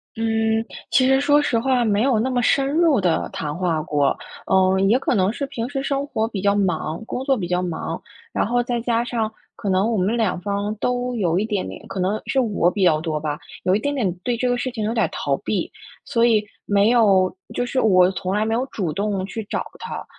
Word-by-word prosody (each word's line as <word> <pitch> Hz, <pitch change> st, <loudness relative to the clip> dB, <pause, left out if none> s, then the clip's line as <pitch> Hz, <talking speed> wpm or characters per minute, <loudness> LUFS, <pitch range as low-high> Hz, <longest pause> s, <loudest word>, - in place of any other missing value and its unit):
嗯， 225 Hz, 0 st, +1 dB, 0.3 s
其 260 Hz, -1 st, +4 dB
实 265 Hz, 0 st, +4 dB
说 290 Hz, +1 st, +4 dB
实 250 Hz, -5 st, +1 dB
话 255 Hz, 0 st, +2 dB
没 210 Hz, -1 st, +2 dB
有 255 Hz, -4 st, +3 dB
那 245 Hz, +4 st, 0 dB
么 250 Hz, -1 st, 0 dB
深 270 Hz, +2 st, +3 dB
入 310 Hz, -5 st, +3 dB
地 175 Hz, -3 st, +1 dB
谈 150 Hz, 0 st, -4 dB
话 170 Hz, -4 st, 0 dB
过， 145 Hz, -2 st, +1 dB, 0.3 s
嗯， 190 Hz, 0 st, +3 dB
也 235 Hz, +6 st, +4 dB
可 260 Hz, -, 0 dB
能 190 Hz, +1 st, +2 dB
是 280 Hz, -, -5 dB
平 245 Hz, -4 st, -4 dB
时 275 Hz, -1 st, -3 dB
生 275 Hz, 0 st, -1 dB
活 220 Hz, -6 st, -1 dB
比 215 Hz, -4 st, -5 dB
较 200 Hz, +1 st, +2 dB
忙， 175 Hz, -4 st, -1 dB
工 250 Hz, -, -4 dB
作 270 Hz, -, +3 dB
比 190 Hz, -8 st, -3 dB
较 180 Hz, +1 st, 0 dB
忙， 175 Hz, -3 st, -4 dB, 0.3 s
然 -, -, 0 dB
后 245 Hz, +1 st, +1 dB
再 240 Hz, -1 st, -2 dB
加 235 Hz, 0 st, 0 dB
上 225 Hz, -3 st, -2 dB, 0.2 s
可 200 Hz, -, -4 dB
能 190 Hz, +5 st, +2 dB
我 225 Hz, -, 0 dB
们 195 Hz, +5 st, +1 dB
两 220 Hz, -6 st, 0 dB
方 200 Hz, +3 st, -2 dB
都 245 Hz, +3 st, -1 dB
有 180 Hz, -5 st, +1 dB
一 210 Hz, -, 0 dB
点 205 Hz, -4 st, -2 dB
点 -, -, -9 dB
可 195 Hz, 0 st, -5 dB
能 195 Hz, +4 st, 0 dB
是 270 Hz, -, +1 dB
我 210 Hz, -8 st, +2 dB
比 195 Hz, +2 st, -1 dB
较 155 Hz, -4 st, +4 dB
多 160 Hz, -2 st, -2 dB
吧， 150 Hz, 0 st, -3 dB, 0.2 s
有 185 Hz, -, +3 dB
一 -, -, +1 dB
点 285 Hz, +5 st, -2 dB
点 205 Hz, -10 st, 0 dB
对 245 Hz, -1 st, 0 dB
这 250 Hz, -, 0 dB
个 245 Hz, -, +2 dB
事 245 Hz, +1 st, -2 dB
情 225 Hz, -4 st, -3 dB
有 220 Hz, -, -1 dB
点 230 Hz, -, +2 dB
儿 -, -, 0 dB
逃 -, -, -1 dB
避， -, -, -2 dB, 0.3 s
所 250 Hz, -5 st, +1 dB
以 215 Hz, -3 st, +3 dB, 0.2 s
没 205 Hz, +1 st, +4 dB
有 195 Hz, -6 st, +4 dB, 0.2 s
就 245 Hz, -, 0 dB
是 255 Hz, +2 st, -1 dB
我 185 Hz, -3 st, +5 dB
从 190 Hz, 0 st, -3 dB
来 210 Hz, +1 st, +1 dB
没 225 Hz, -, 0 dB
有 240 Hz, +3 st, +1 dB
主 180 Hz, -, -3 dB
动 200 Hz, +1 st, -1 dB
去 220 Hz, +3 st, -5 dB
找 -, -, -3 dB
他， -, -, -6 dB
215 Hz, 260 characters per minute, -22 LUFS, 185-245 Hz, 0.3 s, 我